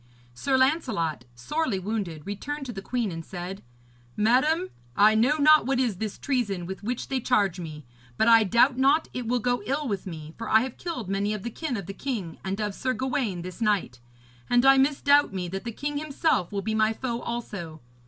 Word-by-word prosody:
Sir 265 - 0
Lancelot, 250 - +1
sorely 255 - -1
wounded, 185 -6 -4
returned 275 +9 -5
to 245 - -6
the 195 - -6
queen, 235 -1 -2
and 165 -1 -6
said: 180 +3 -7 0.6
'Madam, 300 - +2 0.3
I 210 +1 +6
know 245 +8 +3
not 305 -1 +6
what 270 -1 +1
is 235 -7 0
this 215 +1 -4
treason 210 -10 -1
with 190 +2 -6
which 240 +4 -3
they 265 -1 -1
charge 205 -7 +1
me; 155 -3 -8 0.3
but 220 - +3
I 230 -1 +7
doubt 240 +5 +3
not 280 +4 +3
it 250 -2 -4
will 250 +2 +2
go 245 +1 0
ill 285 +2 -1
with 200 -4 -3
me, 155 -3 -8
for 230 - -4
I 220 - +6
have 255 0 -5
killed 330 - -4
many 200 +2 0
of 205 - -7
the 235 - -4
kin 285 -1 -3
of 195 - -5
the 195 - -6
king 200 - -4
and 195 +2 -3
of 210 -2 -1
Sir 255 +5 -1
Gawaine 250 -9 -2
this 185 +5 -8
night. 205 - 0 0.5
And 245 +1 +4
I 270 0 +7
misdoubt 285 -1 +3
me 180 -1 -2
that 195 +5 -5
the 235 - -3
king 290 +5 -3
himself 300 - 0
will 200 -1 -3
be 220 - -1
my 220 0 +2
foe 235 0 -3
also. 195 -9 -5
225 Hz, 210 wpm, -26 LUFS, 195-265 Hz, 0.6 s, I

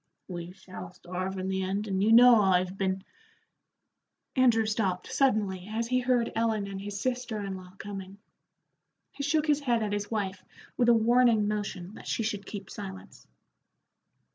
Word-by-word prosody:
"We 175 -1 -6
shall 185 -2 -10
starve 185 +2 -5
in 185 0 -3
the 190 0 -1
end, 195 +3 -2
and 190 -1 0
you 215 +2 +3
know 240 -1 +8
I've 185 -1 +2
been 190 -1 -1 0.7
" - - -55
Andrew 240 -4 +4
stopped 200 -4 -1
suddenly 205 -8 +1
as 230 +2 -2
he 255 0 +3
heard 245 -2 +1
Ellen 225 -2 +1
and 195 -1 -6
his 200 0 -5
sister 245 -2 -2
in 195 -1 -4
law 185 -1 -11
coming. 195 -1 -7 0.9
He - - -8
shook 300 +2 +1
his 300 -2 +3
head 240 -6 +1
at 205 -1 -2
his 205 0 -2
wife 200 -4 -3 0.3
with 240 -1 +3
a - - +8
warning 230 -1 +4
motion 200 -3 -3
that - - -11
she 225 - -1
should 205 -2 -3
keep 200 -3 -7
silence. 190 -2 -9
205 Hz, 170 wpm, -29 LUFS, 190-230 Hz, 0.9 s, know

